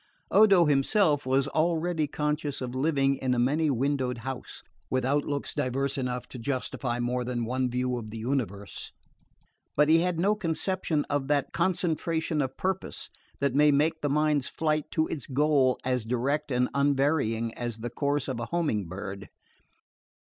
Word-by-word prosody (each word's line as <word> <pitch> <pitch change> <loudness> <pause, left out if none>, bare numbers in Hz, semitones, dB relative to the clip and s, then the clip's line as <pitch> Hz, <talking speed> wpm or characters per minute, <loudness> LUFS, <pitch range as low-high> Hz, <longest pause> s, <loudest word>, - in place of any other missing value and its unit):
Odo 195 -5 +6
himself 145 +1 +2
was 135 +1 +2
already 165 -1 +1
conscious 150 0 -2
of 125 -1 -4
living 135 0 +1
in 130 -1 0
a - - -2
many 145 +6 +2
windowed 130 -1 0
house, 130 +2 -7 0.3
with 130 -1 0
outlooks 145 +1 -1
diverse 135 +2 -1
enough 125 -2 -3
to 125 - -8
justify 125 -1 -2
more 125 +1 -1
than 120 -1 -2
one 130 +2 0
view 125 +1 -1
of 110 -2 -8
the 110 - -7
universe; 110 -5 -3 0.8
but 150 +1 +4
he 165 +1 +6
had 175 -1 0
no 200 +4 +3
conception 170 -4 -1
of 145 -2 -1
that 145 -1 0
concentration 165 -3 0
of 130 -1 -3
purpose 190 0 -3 0.3
that 140 -2 +1
may 150 +2 +5
make 155 +3 +1
the 145 - 0
mind's 150 -1 +2
flight 155 -2 -1
to 160 - +1
its 155 - -5
goal 140 -2 +3
as 125 -2 0
direct 135 +6 -1
and 125 0 +2
unvarying 140 -5 +1
as 120 -2 -4
the 115 +1 -5
course 145 +1 -1
of 130 -4 -3
a 115 - -4
homing 145 - 0
bird. 95 +2 -7
140 Hz, 160 wpm, -28 LUFS, 125-155 Hz, 0.8 s, Odo